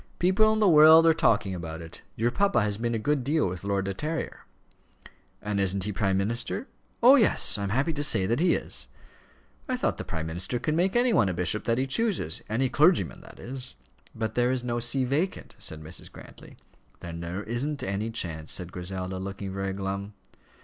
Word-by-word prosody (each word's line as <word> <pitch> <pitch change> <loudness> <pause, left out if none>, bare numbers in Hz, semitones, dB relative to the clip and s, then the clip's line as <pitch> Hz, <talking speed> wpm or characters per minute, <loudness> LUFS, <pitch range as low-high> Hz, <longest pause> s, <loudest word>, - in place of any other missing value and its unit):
People 190 +5 +3
in 220 - 0
the 210 - +4
world 160 0 +8
are 165 - +6
talking 105 -10 +2
about 80 -2 -6
it. 80 -1 -11
Your 115 +2 0
papa 200 - +2
has 105 0 -1
been 115 0 -1
a - - +1
good 140 +4 0
deal 150 +1 +1
with 90 0 -6
Lord 100 -1 -1
De 95 - -2
Terrier." 155 - -5 1.0
"And 105 -1 -1
isn't 95 0 +1
he 105 +2 -2
prime 95 -1 0
minister?" 115 - -2 0.4
"Oh, 250 +3 +9
yes; 225 - +3
I - - -3
am 100 - -2
happy 135 - 0
to 145 -1 -2
say 95 -9 +3
that 115 +7 0
he 175 +1 +3
is." - - -4 0.8
"I - - 0
thought - - -1
the - - -3
prime 80 0 -4
minister 90 +9 -3
could 150 +5 -1
make 180 +6 +1
any 240 0 +3
one 100 - +3
a 90 - -3
bishop 90 +4 -1
that 115 -1 +1
he 130 - +1
chooses, 150 - -1
any 120 +5 +1
clergyman, 155 +7 +2
that - - -15
is." 130 +1 -7 0.4
"But 110 -1 -3
there 120 +1 +2
is 130 -1 -1
no 120 -1 -2
see 125 +3 +1
vacant," 155 +9 -2
said 80 0 -5
Mrs. 80 +3 -6
Grantly. - - -14 0.4
"Then 85 -1 -7
there 85 +4 -5
isn't 140 +7 -3
any 100 +3 -2
chance," 80 -8 -4
said 90 -1 -3
Griselda, 95 +1 -5
looking 95 0 -6
very 95 0 -2
glum. 100 +1 -4
110 Hz, 205 wpm, -27 LUFS, 95-145 Hz, 1.0 s, Oh